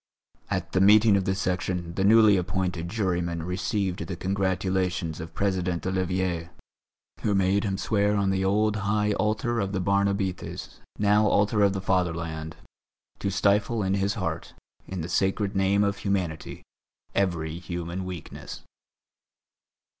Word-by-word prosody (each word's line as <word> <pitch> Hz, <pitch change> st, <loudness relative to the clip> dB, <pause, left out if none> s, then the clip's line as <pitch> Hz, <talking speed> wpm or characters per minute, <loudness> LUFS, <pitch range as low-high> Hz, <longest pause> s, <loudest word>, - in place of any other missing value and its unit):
At -, -, -2 dB
the 95 Hz, -, +2 dB
meeting 105 Hz, +1 st, +6 dB
of 95 Hz, -1 st, +1 dB
the 95 Hz, -1 st, +1 dB
Section, 90 Hz, -2 st, -2 dB
the 95 Hz, -, -1 dB
newly 110 Hz, 0 st, +6 dB
appointed 90 Hz, -2 st, -2 dB
juryman 85 Hz, -5 st, -1 dB
received 90 Hz, 0 st, -2 dB
the 90 Hz, -, -4 dB
congratulations 95 Hz, -3 st, -1 dB
of 80 Hz, -, -5 dB
the -, -, -31 dB
President 90 Hz, -3 st, -1 dB
Olivier, 95 Hz, -2 st, -1 dB, 0.7 s
who 105 Hz, -, 0 dB
made 95 Hz, +1 st, +2 dB
him 95 Hz, -3 st, -1 dB
swear 105 Hz, 0 st, +1 dB
on 100 Hz, -1 st, +1 dB
the 95 Hz, 0 st, 0 dB
old 105 Hz, +2 st, +2 dB
high 105 Hz, 0 st, +1 dB
altar 110 Hz, +3 st, 0 dB
of 100 Hz, -1 st, -2 dB
the 95 Hz, -, 0 dB
Barnabites, 100 Hz, 0 st, -1 dB, 0.2 s
now 105 Hz, +1 st, +3 dB
altar 105 Hz, +1 st, +2 dB
of 100 Hz, -1 st, +4 dB
the 95 Hz, -, -3 dB
fatherland, 80 Hz, -4 st, -1 dB, 0.6 s
to 100 Hz, -, -1 dB
stifle 105 Hz, +3 st, +2 dB
in 95 Hz, 0 st, 0 dB
his 100 Hz, 0 st, 0 dB
heart, 80 Hz, -6 st, -4 dB, 0.3 s
in 95 Hz, -2 st, -4 dB
the 80 Hz, -, -4 dB
sacred 95 Hz, +3 st, 0 dB
name 95 Hz, +1 st, +3 dB
of 100 Hz, 0 st, 0 dB
humanity, 90 Hz, -6 st, -3 dB, 0.5 s
every 85 Hz, -4 st, -1 dB
human 85 Hz, +1 st, -5 dB
weakness. 90 Hz, -3 st, -8 dB
95 Hz, 145 wpm, -26 LUFS, 90-100 Hz, 0.7 s, meeting